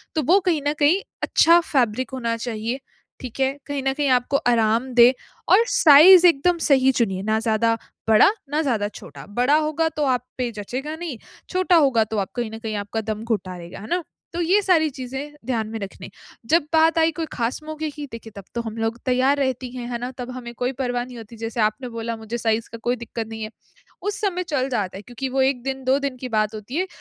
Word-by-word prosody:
तो 310 - +1
वो 360 +9 +5
कहीं 315 -4 +1
न 290 - +2
कहीं 315 +7 +4 0.2
अच्छा 335 +1 +5
फ़ैब्रिक 255 -6 0
होना 235 -3 -2
चाहिए। 230 +2 -3 0.4
ठीक 255 0 -8
है? 265 0 +2
कहीं 285 -1 -3
न 270 - +1
कहीं 290 +1 -1
आपको 250 +2 +2
आराम 230 +1 +2
दे 240 +1 +7 0.4
और 375 - +8
साइज़ 335 +5 +8
एकदम 340 +2 +3
सही 265 -4 +4
चुनिए, 195 -7 0
ना 220 +1 +1
ज़्यादा 225 0 +1 0.3
बड़ा 220 - +7 0.2
ना 300 +2 0
ज़्यादा 230 -9 0
छोटा। - - -11
बड़ा 250 +4 +3
होगा 310 +1 0
तो 305 -1 -3
आप 250 -3 +1
पे 250 -2 -1
जचेगा 255 +8 -5
नहीं, 320 -6 -6 0.3
छोटा 370 -1 +2
होगा 270 -8 +4
तो 220 0 -5
आप 195 - -3
कहीं 240 -3 -2
न 220 - -7
कहीं 220 -1 -4
आपका 205 +2 -3
दम 215 0 -4
घुटा 195 -5 -3
देगा, 170 0 -10
है 215 - -9
ना? 350 0 -1 0.3
तो 345 - -2
ये 370 +5 +3
सारी 340 -5 +3
चीज़ें 270 +2 -7
ध्यान 230 -4 -1
में 225 +1 -5
रखनी। 195 -2 -8 0.4
जब 330 +7 +3
बात 320 0 +4
आई 320 0 +4
कोई - - -1
खास 235 +5 -2
मौके 310 0 -4
की 295 0 -7
देखिए 230 -1 -9
तब 200 - -9
तो 235 - 0
हम 225 -1 -7
लोग 225 +1 -2
तैयार 260 +3 +2
रहती 260 -2 -1
हैं, 240 -1 -5
है 240 - -2
ना? 245 +1 -4
तब 250 0 -6
हमें 245 -2 -8
कोई 250 +2 -1
परवाह 245 -1 -1
नहीं 250 -1 -11
होती 225 0 -11
जैसे 225 +1 -3
आपने 215 +4 0
बोला 230 0 -4
मुझे 220 +2 -5
साइज़ 225 0 -1
का 230 - -7
कोई 245 - +2
दिक्कत 230 -1 -6
नहीं 220 0 -6
है। 215 - -5 0.5
उस 410 0 -3
समय 375 -4 -1
चल 260 -1 +1
जाता 210 -8 -2
है - - -10
क्योंकि 245 +5 -5
वो 265 +1 +1
1 265 -2 +1
दिन 270 0 -4
2 260 +2 +3
दिन 265 -2 -4
की 255 0 -6
बात 215 0 0
होती 215 +6 -7
है। 370 +3 0
250 Hz, 230 wpm, -22 LUFS, 225-290 Hz, 0.5 s, और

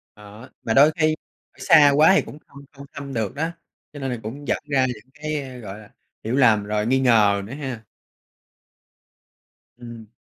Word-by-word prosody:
Đó, 105 +4 -14
mà 115 - -1
đôi 145 +5 +6
khi 155 -1 +1 0.4
ở - - -31
xa 145 -3 +6
quá 155 +5 +6
thì - - +4
cũng - - -11
không 140 - -15
không 140 -1 -13
thăm 140 -1 -8
được 115 +1 -3
đó, 160 +3 -2 0.4
cho 145 - -9
nên 135 -2 -3
là 125 - -3
cũng 140 +7 -8
dẫn - - +1
ra 130 -2 +2
những 125 0 -8
cái, 155 0 -4
a, 130 -2 -10
gọi 105 -4 -9
là, 110 - -15 0.3
hiểu 115 +4 -2
lầm 115 -6 +4
rồi 105 +1 -2
nghi 130 +3 +1
ngờ 110 -6 +3
nữa 115 - -9
ha. 130 -6 -6 2.0
Ừm. 115 -2 -11
130 Hz, 195 wpm, -22 LUFS, 110-145 Hz, 2.0 s, đôi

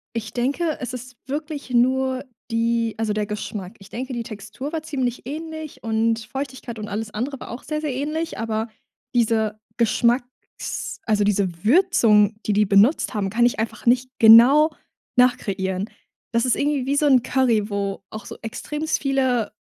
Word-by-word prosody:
Ich 220 -2 -4
denke, 285 +6 0
es 250 -1 -4
ist 250 0 -8
wirklich 295 -1 -5
nur 260 +2 +2 0.3
die 230 0 +1
also 215 -2 0
der 210 -1 0
Geschmack. 210 -1 -6
Ich 195 - -14
denke, 255 +5 -5
die 240 - -2
Textur 215 +7 -7
war 320 -2 -2
ziemlich 260 -5 -2
ähnlich 315 +1 -7
und 225 0 +1
Feuchtigkeit 260 -4 -5
und 210 - -5
alles 215 +1 -4
andere 260 +4 -3
war - - -8
auch 240 - -7
sehr, 305 +2 -3
sehr 295 -4 -2
ähnlich, 305 +5 -3
aber 225 0 -2 0.5
diese 220 -2 +1 0.2
Geschmacks 240 +2 -1
also 210 -2 +2
diese 190 -3 0
Würzung, 225 - +4
die 210 - +2
die 210 +1 +3
benutzt 210 - +4
haben, 195 -2 -1
kann 240 +3 +3
ich 245 - 0
einfach 225 +1 -4
nicht 250 +1 +3
genau 245 +8 +8 0.5
nachkreieren. 200 -6 +1 0.4
Das 230 +1 +2
ist 255 - +3
irgendwie 285 -2 0
wie 280 +1 +1
so 295 - +3
'n 260 -4 +5
Curry, 240 -5 +1
wo 200 -1 -3
auch 215 -1 -8
so - - -8
extrem 300 +7 -3
viele, 260 -5 +1
235 Hz, 170 wpm, -23 LUFS, 215-270 Hz, 0.5 s, genau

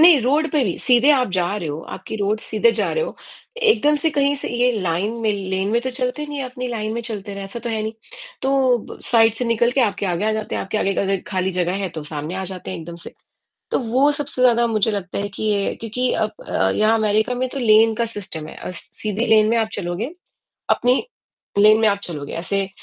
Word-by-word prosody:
नहीं, 325 -3 +8
रोड 290 +6 +2
पर 290 -6 +2
ही 180 - -2
सीधे 250 +3 +4
आप 260 -4 +3
जा 180 -2 +1
रहे 170 -7 -4
हो 145 +2 -4
आपकी - - -7
रोड 210 +1 0
सीधे 470 - +2
जा - - -1
रहे 475 - 0
हो, - - -7 0.4
एकदम 440 -11 +3
से 315 +2 +1
कहीं 285 -1 +2
से 280 - -4
ये 245 +1 +2
लाइन 185 +4 -1
में 220 - +2
लेन 190 -1 -2
में 235 - +3
तो 260 - -2
चलते 255 +3 -2
हैं 300 - -6
नहीं, 290 -1 -4
अपनी 255 0 -5
लाइन 215 -2 -3
में 235 - -2
चलते 210 -3 -5
रहे 200 0 -6
ऐसा 195 +4 -6
तो 235 - -5
है 220 -1 -1
नहीं। 220 +1 -3 0.5
तो 265 -2 +3
ब - - -10
साइड 225 -2 +4
से 245 - -2
निकल 230 0 +2
के 270 - +2
आपके 205 -4 +1
आगे 180 +2 -1
आ 220 - +2
जाते 215 0 -3
हैं। - - -1
आपके 205 +3 -2
आगे 195 -1 0
अगर 195 -1 0
खाली 190 -1 -1
जगह 180 -1 0
है - - -1
तो 160 -3 -7
सामने 150 +2 -5
आ 190 0 -3
जाते 185 -1 -6
हैं 185 - -5
एकदम 170 +1 -8
से। - - -10 0.6
तो - - +2
वो 260 +4 +2
सबसे 285 -3 -3
ज़्यादा 240 -1 +5
मुझे 220 -1 +1
लगता 195 -3 -4
है 200 - -1
कि - - -4
ये 205 -2 +1
क्योंकि 245 +3 -1
अब 215 -1 0 0.2
अ, 95 - +1
यहाँ 215 +1 +3
अमेरिका 215 +3 +1
में 255 +1 -1
तो 275 - -5
लेन 225 -1 +5
का 235 - 0
सिस्टम 190 -8 -6
है। - - -10
अ, - - -6
सीधी 215 +5 -3
लेन 215 -1 +5
में 230 - +3
आप 225 -1 +1
चलोगे, 200 - -3 0.6
अपनी 250 +1 +3 0.6
लेन 215 +1 +7
में 220 - +5
आप 200 - +1
चलोगे। 150 -6 -6
ऐसे 195 +3 -1
220 Hz, 245 wpm, -21 LUFS, 195-250 Hz, 0.6 s, नहीं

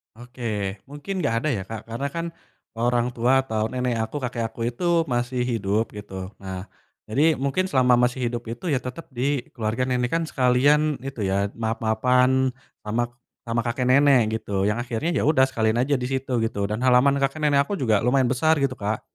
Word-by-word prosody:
Oke 115 -5 -4
mungkin 145 +8 -6
nggak 115 - +1
ada 155 - 0
ya 110 -8 -1
Kak 110 +2 -8
karena 115 +5 -3
kan, 170 0 -2 0.5
orang 120 +1 +1
tua 125 +3 +3
atau 110 -4 -2
nenek 125 -2 -1
aku 110 +5 -3
kakek 120 -2 -2
aku 115 - -10
itu 125 +9 -5 0.3
masih 125 +1 -1
hidup 110 -2 0
gitu 100 -1 -9 0.3
nah, 95 -1 -6 0.4
jadi 155 +8 +3
mungkin 140 +7 +1
selama 130 -2 +4
masih 125 +1 -2
hidup 120 0 -4
itu 120 +9 -7
ya - - +3
tetep 130 +7 -8
di 130 +1 -1
keluarga 115 +2 -1
nenek 125 -1 0
kan 165 0 +1
sekalian 130 +3 +3 0.2
itu 135 -4 -6
ya 100 +1 +1
maaf-maafan, 125 +4 +2 0.4
sama 115 +3 0 0.4
sama 115 0 0
kakek 125 +2 -1
nenek 140 -1 +6 0.2
gitu 95 -1 -1
yang 105 - -1
akhirnya 120 +7 -2
ya - - +1
udah 130 -4 +5
sekalian 110 -1 +1
aja 145 - 0
di 125 - -3
situ 135 0 -3
gitu 100 - -4
dan 105 - -1
halaman 130 +3 +5
kakek 135 +3 -1
nenek 140 -1 +4
aku 205 - -4
juga 110 -4 +3
lumayan 130 0 +3
besar 145 +5 +3
gitu 135 -2 +1
Kak, 105 +1 -2
125 Hz, 190 wpm, -24 LUFS, 115-135 Hz, 0.5 s, nenek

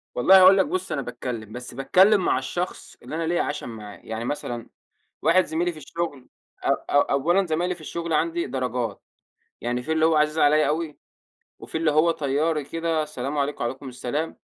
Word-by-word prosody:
والله 190 +10 +7
هاقول 190 +1 +8
لك 190 - +4
بُص، 365 +5 -3
أنا 140 - -1
باتكلِّم، 120 -3 -6
بس 125 +2 -7
باتكلِّم 190 +9 +4
مع - - +2
الشخص 175 +8 -5
اللي - - -6
أنا 165 0 -2
ليّا 170 +1 +1
عَشَم 150 -4 -4
معاه. 105 -3 -9
يعني 110 +1 -6
مثلًا 120 -3 -4 0.5
واحد 175 +4 +4
زميلي 170 +2 -1
في 155 - -12
الشُغل 145 -2 -5 0.4
أ - - 0 0.2
أ 145 - +3
أولًا 175 +8 +2
زمايلي 175 +3 0
في 170 - -17
الشُغل 170 +1 -4
عندي 165 +2 0
درجات، 125 -5 -3 0.6
يعني 120 +1 -2
فيه 160 - -4
اللي 160 0 +3
هو 160 0 +4
عزيز 150 +1 +2
عليّا 150 +1 +4
أوي 155 0 -2 0.6
وفيه 160 - -5
اللي 160 -1 +2
هو 155 +3 +4
طيّاري 150 +1 0
كده، 165 +1 -1
سلام 145 -1 -4
عليكم، 145 -1 -1
عليكم 130 +3 -4
السلام 125 +6 -4
150 Hz, 185 wpm, -24 LUFS, 130-170 Hz, 0.6 s, هاقول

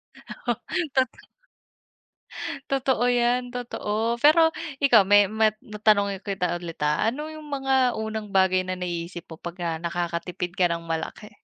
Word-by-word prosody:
Oo. - - -4 0.4
Totoo. 260 -2 0 1.5
Totoo 265 -3 +1 0.2
yan, 245 +1 +2
totoo. 240 -4 -4 0.3
Pero 315 +3 +7 0.4
ikaw, 245 -6 +7
may 205 0 +8 0.2
mat 215 -1 +4 0.3
tanungin 200 -2 +3
kita 190 -2 0
ulit, 170 -1 -8
ah. 150 - +1
Ano 285 +5 -5
yung 310 -1 -10
mga 270 -1 +1 0.3
unang 220 -1 -4
bagay 185 0 +4
na 185 - -3
naiisip 175 0 -4
mo 165 - -8
pagka 175 0 -3
nakakatipid 175 +1 -3
ka 180 - +4
ng 170 0 -5
malaki? 165 +6 -4
200 Hz, 135 wpm, -25 LUFS, 175-245 Hz, 1.5 s, may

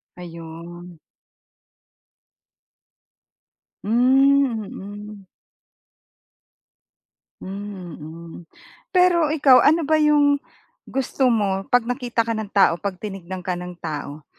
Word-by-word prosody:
Ayun. 170 0 -10 2.8
Hmm, 255 +1 +3
mm. 205 0 -10 2.1
Hmm, 195 -3 -7
mm. 165 +2 -10 0.5
Pero 355 -4 +3
ikaw 285 -4 +5
ano 320 +2 +3
ba 315 - 0
'yong 290 -1 +3 0.5
gusto 265 0 0
mo 200 -4 +1
'pag 245 -2 +3
nakita 245 -2 -1
ka 230 - -1
ng 220 -2 -4
tao 195 -4 +3
'pag 200 -2 -3
tinignan 185 -2 -7
ka 185 - -1
ng 180 0 -7
tao? 150 -1 -6
205 Hz, 90 wpm, -22 LUFS, 180-265 Hz, 2.8 s, ikaw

